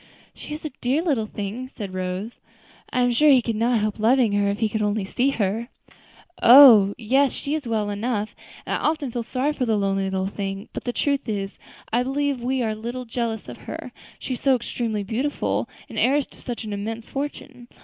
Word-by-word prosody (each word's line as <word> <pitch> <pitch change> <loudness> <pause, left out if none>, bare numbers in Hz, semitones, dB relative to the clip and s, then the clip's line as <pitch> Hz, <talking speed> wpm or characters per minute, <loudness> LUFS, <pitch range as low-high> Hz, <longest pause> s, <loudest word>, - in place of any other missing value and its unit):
"She - - -10
is 310 - -9
a 305 - -3
dear 270 +7 +1
little 265 -11 0
thing," 210 +5 -5
said 205 -7 -7
Rose. 185 +4 -4 0.5
"I 250 - 0
am 245 0 +3
sure 300 +6 +4
he 270 -3 +7
could 230 -1 -2
not 235 +2 +2
help 215 0 -2
loving 235 +1 +4
her, 205 0 +2
if 200 - -1
he 225 - +1
could 215 +1 -2
only 205 -1 0
see 250 +7 +1
her." 225 -1 -1 0.7
"Oh! 235 -6 +9
yes, 265 +4 +2
she 285 - -3
is 305 -5 -2
well 215 -2 -1
enough, 210 0 -2 0.3
and - - -2
I - - +1
often 305 -4 -1
feel 240 - -2
sorry 260 +5 -1
for 255 -4 -2
the 220 -1 +2
lonely 195 -1 0
little 190 0 -1
thing, 195 +1 -5
but - - -6
the 245 - 0
truth 280 0 -1
is, 200 -2 -3 0.3
I 240 - +3
believe 275 0 -1
we 255 +1 0
are 220 - 0
a - - -2
little 240 +4 -5
jealous 225 -2 -3
of - - -8
her; - - -6 0.3
she 260 - -4
is 245 - -6
so 270 -2 +4
extremely 230 -3 -3
beautiful, 250 +8 -1 0.2
and - - -5
heiress 280 +2 +3
to - - -15
such 240 -1 -5
an 215 -1 -5
immense 220 +3 -5
fortune. 275 -3 -6
235 Hz, 215 wpm, -23 LUFS, 210-260 Hz, 0.7 s, Oh